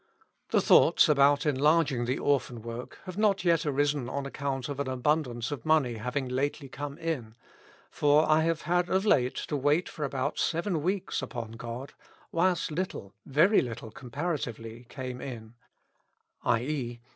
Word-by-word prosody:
" - - -47
The - - +3
thoughts - - +6
about 145 0 +4
enlarging 145 -2 +2
the 125 +3 -1
Orphan 125 -5 0
work 115 +1 -7
have 185 +1 -6
not 200 -3 +2
yet 165 -2 +3
arisen 145 -2 0
on 140 +1 -3
account 135 -2 -3
of 140 -1 -5
an 140 - -1
abundance 130 -2 0
of 140 -5 -5
money 155 -6 +3
having 125 +4 -2
lately 140 +3 -2
come 145 +2 -6
in; 135 -10 -4 0.6
for 150 +1 +3
I 155 0 +4
have 165 0 0
had 175 +2 +1
of 190 +2 +1
late 130 -11 +3
to 150 - -3
wait 145 +5 +2
for 155 - -6
about 140 0 -2
seven 170 0 0
weeks 185 +4 -1
upon 115 -4 -5
God, 120 +4 -7 0.4
whilst 175 -1 +1
little, 150 - -4
very 165 +10 +4
little 115 -2 -6
comparatively, 125 -5 -5
came 130 -2 -6
in, 115 -4 -7 0.9
i. 115 - +2
e. 125 -5 -4
140 Hz, 160 wpm, -29 LUFS, 125-160 Hz, 0.9 s, thoughts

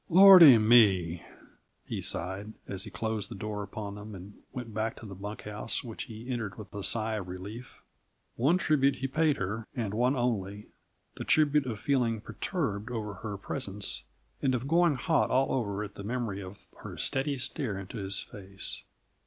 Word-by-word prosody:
"Lordy 180 -7 +10
me!" 100 -7 +5 0.6
he - - -4
sighed, 95 +5 -2
as 95 +1 -4
he - - -7
closed 110 -1 -3
the - - -7
door 105 +1 -4
upon 100 0 -6
them 105 +1 -8
and 95 +2 -10 0.2
went 125 -4 -7
back 110 +1 -1
to - - -10
the 100 - -8
bunk 105 +3 -7
house, 105 +2 -3
which 115 -3 -6
he 115 +1 -10
entered 115 -7 -3
with 105 -4 -10
a 100 -1 -5
sigh 110 0 +1
of 95 -3 -5
relief. 100 +7 -9 0.5
One 145 +9 +3
tribute 140 -6 +3
he 135 +1 -3
paid 150 +1 +2
her, 105 +4 -3
and 110 -6 -2
one 125 +5 +2
only: 105 -5 -2 0.5
the - - -4
tribute 150 -3 +3
of 110 -4 -4
feeling 120 -5 +1
perturbed 110 - -3
over 110 -4 -4
her 105 -2 -4
presence, 100 -2 -3 0.4
and 130 -2 +2
of 125 +2 -3
going 170 0 +4
hot 155 +5 +1
all 135 +1 +2
over 105 -5 -1
at 105 -1 -8
the 100 - -8
memory 110 -3 -3
of 95 +1 -9 0.2
her - - -9
steady 140 +1 0
stare 125 -4 -1
into 95 +4 -7
his 95 -1 -1
face. 95 -1 -6
110 Hz, 180 wpm, -29 LUFS, 100-130 Hz, 0.6 s, Lordy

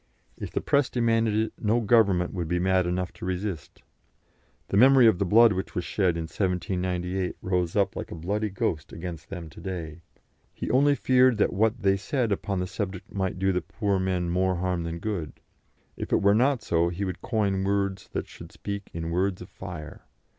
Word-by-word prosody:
If - - -6
the - - -1
press 140 -2 +2
demanded 115 -3 +1
it, 110 0 0
no 110 +2 +2
Government 100 -6 +3
would 90 -4 -3
be 90 +2 0
mad 95 0 +2
enough 90 0 -2
to - - -13
resist. 90 -4 -4 0.9
The - - -1
memory 130 +2 +7
of 110 -5 +5
the 100 - +1
blood 115 +3 +6
which 95 0 -4
was 90 - -2
shed 90 -5 +1
in 85 - -2
1798 90 +1 -2
rose 90 -2 0
up 100 -2 +2
like - - -5
a - - -6
bloody 100 +6 -2
ghost 85 -5 -2
against 85 -1 -7
them 90 -4 -6
to - - -13
day. 85 -4 -6 0.5
He - - -3
only 145 +3 +4
feared 130 -3 +4
that 105 - +2
what 110 +3 +1
they 95 0 +3
said 115 +3 -1
upon 100 -1 -1
the 90 - -1
subject 95 0 -5
might 95 -2 -2
do 95 +1 +2
the 90 -1 0
poor 100 +2 -1
men 95 -2 0
more 95 +1 +1
harm 90 -1 -1
than 85 0 -4
good. 85 -5 -4 0.6
If - - -6
it - - +2
were 100 +1 +5
not 125 +3 +2
so, 85 0 +2
he 90 +4 -3
would 95 - -5
coin 100 -5 0
words 100 -1 -1
that - - -3
should - - -12
speak 100 -1 -6
in 85 0 -4
words 95 +2 0
of 90 - -10
fire. 85 -5 -8
95 Hz, 200 wpm, -26 LUFS, 90-105 Hz, 0.9 s, memory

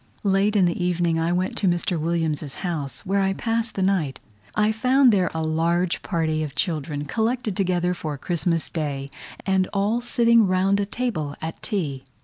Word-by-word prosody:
Late 200 +1 +2
in 195 -3 +5
the 175 +1 0
evening 175 -2 +1
I 165 +1 +1
went 180 +1 0
to 195 - +1
Mr. 175 -1 +1
Williams's 155 -3 -1
house, 150 -7 -4
where 195 +1 +1
I 195 0 +1
passed 230 +2 -1
the 190 - 0
night. 180 -8 0 0.4
I 210 0 +3
found 255 +2 +4
there 185 -3 +2
a 160 0 -3
large 170 +3 +1
party 160 -4 -1
of 150 -3 -4
children, 150 -4 -1
collected 225 - -1
together 180 -2 +1
for 155 -4 -5
Christmas 165 +1 -1
Day, 140 -4 -4 0.3
and 190 -1 +2
all 210 +4 +1
sitting 235 -2 +4
round 190 +2 +2
a 200 - -1
table 190 - -2
at 160 0 -6
tea. 145 -10 -3
180 Hz, 175 wpm, -24 LUFS, 160-200 Hz, 0.4 s, in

